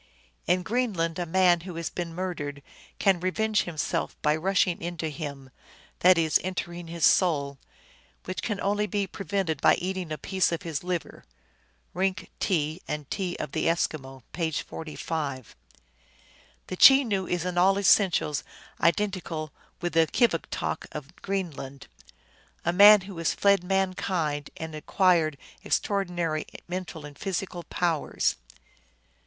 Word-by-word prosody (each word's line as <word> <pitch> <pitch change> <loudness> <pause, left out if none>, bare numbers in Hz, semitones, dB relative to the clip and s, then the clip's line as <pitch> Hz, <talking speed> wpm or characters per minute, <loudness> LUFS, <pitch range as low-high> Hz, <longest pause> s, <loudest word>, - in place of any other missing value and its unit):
" - - -37
In 180 +2 +2
Greenland 185 -7 -1
a 175 - -2
man 180 0 +4
who 175 0 -8
has 165 0 -4
been 170 -2 -5
murdered 145 -6 -4 0.3
can 195 -3 +3
revenge 215 +4 +1
himself 160 -4 -3
by 150 0 +3
rushing 185 +1 +1
into 170 -2 -3
him," 140 -4 -7 0.5
that 180 0 +6
is, 160 -2 +3
entering 175 -2 -4
his 165 -2 0
soul, 140 -6 +2 0.3
" - - -31
which 185 - -4
can 210 -4 -2
only 205 +1 +1
be 200 +1 -1
prevented 190 -5 -2
by - - +6
eating 185 -2 -4
a 155 - -2
piece 190 +5 0
of 170 - -3
his 160 -3 -4
liver." 180 -2 -4 0.7
(Rink, 190 +1 -1
T. 160 -1 0
and 150 -2 -5
T. 185 -3 -2
of 150 - -4
the - - 0
Eskimo, 135 -6 -1
page 160 -3 -1
45.) 150 -5 -5 1.1
The 185 - -6
Chenoo 225 -9 +6
is 175 -1 -1
in 180 -1 0
all 195 +2 +4
essentials 185 -6 +3 0.4
identical 170 -4 0 0.3
with 175 -2 -2
the 165 -1 +4
Kivigtok 215 - 0
of 150 +3 -8
Greenland, 155 -8 -4 0.4
" - - -32
a 170 - +2
man 205 +2 +9
who 195 +1 -9
has 165 - 0
fled 200 -2 +3
mankind, 180 -5 -1
and 160 0 -6
acquired 160 -1 +2 0.3
extraordinary 175 -6 -1 0.2
mental 175 -4 -5
and 145 -1 -10
physical 190 -2 -3
powers. 170 -4 0
175 Hz, 140 wpm, -27 LUFS, 155-190 Hz, 1.1 s, man